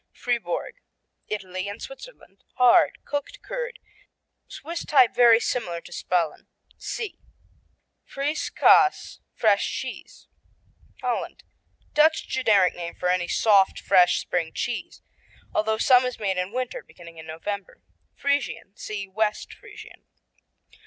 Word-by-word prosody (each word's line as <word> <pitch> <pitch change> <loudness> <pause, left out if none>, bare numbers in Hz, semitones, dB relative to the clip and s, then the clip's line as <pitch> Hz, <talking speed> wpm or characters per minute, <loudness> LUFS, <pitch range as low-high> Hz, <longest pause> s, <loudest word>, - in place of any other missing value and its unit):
Fribourg 245 - -3 0.5
Italy 190 -2 -4
and 205 - -7
Switzerland - - -12
Hard; 250 -1 +4
cooked 290 - -5
curd, - - -5 0.7
Swiss 335 +2 -6
type 260 -5 +4
very 235 -2 +6
similar 200 -9 -2
to 170 - -15
Spalen. 175 -2 -2 0.3
(See) 440 -5 -6 0.8
Frissche 290 +3 -3
Kaas, 380 -2 +4 0.2
Fresh - - +2
cheese - - -7 0.7
Holland - - -3 0.5
Dutch 315 +2 +3
generic 210 -8 +3
name 170 -1 -7
for 180 - -1
any 180 -1 +1
soft, 200 -2 +3
fresh 180 -2 +4
spring 165 -2 -2
cheese, 240 -1 -4 0.5
although 220 +1 +1
some 250 +2 +5
is 250 -1 -3
made 195 -3 -1
in 180 +2 -3
winter, 255 +1 -3
beginning 170 -1 -15
in 160 - -10
November. 190 +5 -6 0.3
Friesian 280 -8 -2
see 205 -2 -6
West 210 +2 -2
Friesian. - - -14
215 Hz, 120 wpm, -25 LUFS, 185-275 Hz, 0.8 s, very